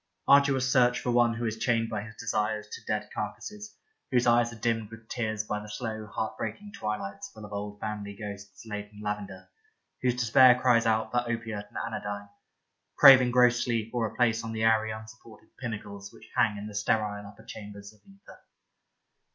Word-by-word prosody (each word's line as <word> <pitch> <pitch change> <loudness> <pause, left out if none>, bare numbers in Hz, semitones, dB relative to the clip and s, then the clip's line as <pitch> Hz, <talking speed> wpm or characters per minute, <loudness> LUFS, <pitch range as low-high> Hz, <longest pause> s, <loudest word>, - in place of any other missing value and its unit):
Arduous 140 -2 +5
search 125 -1 +4
for 125 - -1
one 120 -1 +3
who 120 +1 -3
is 110 0 -3
chained 115 -2 +1
by 110 -2 -3
his 110 +1 -10
desires 105 -1 -2
to - - -8
dead 105 -1 -2
car 105 -1 -3
cases, 210 0 -10 0.3
whose 125 -2 +2
eyes 120 0 +4
are - - -9
dimmed 115 -1 -1
with 115 0 -13
tears 110 -3 -2
by 105 0 -3
the 105 0 -10
slow 110 -1 -5
heart 110 +1 -3
breaking 205 - -5
twilights 105 - -4
full 110 - -11
of 105 - -10
old 105 0 -5
family 105 -1 -5
ghosts 100 +1 -9
laid 105 -1 -6
in 105 - -14
lavender, 105 -2 -5 0.5
whose 125 -1 +2
despair 125 +1 +6
cries 120 -3 +4
out 110 0 +1
for 120 0 +1
opiate 110 -3 -4
and - - -9
anodyne, 100 0 -5 0.7
craving 130 -2 +9
gross 125 0 +4
sleep 115 -2 -1
or 120 -2 0
a - - -11
place 115 -2 +2
on 115 0 -5
the 110 0 -2
airy 110 -1 +3
unsupported 110 0 -10
pinnacles 100 -5 -6
which - - -17
hang 105 -3 +2
in 100 - -6
the 105 - -8
sterile 105 -1 -1
upper 105 +2 -14
chambers 100 -1 -9
of 105 - -25
ether. 195 +2 -16
110 Hz, 190 wpm, -28 LUFS, 105-120 Hz, 0.7 s, craving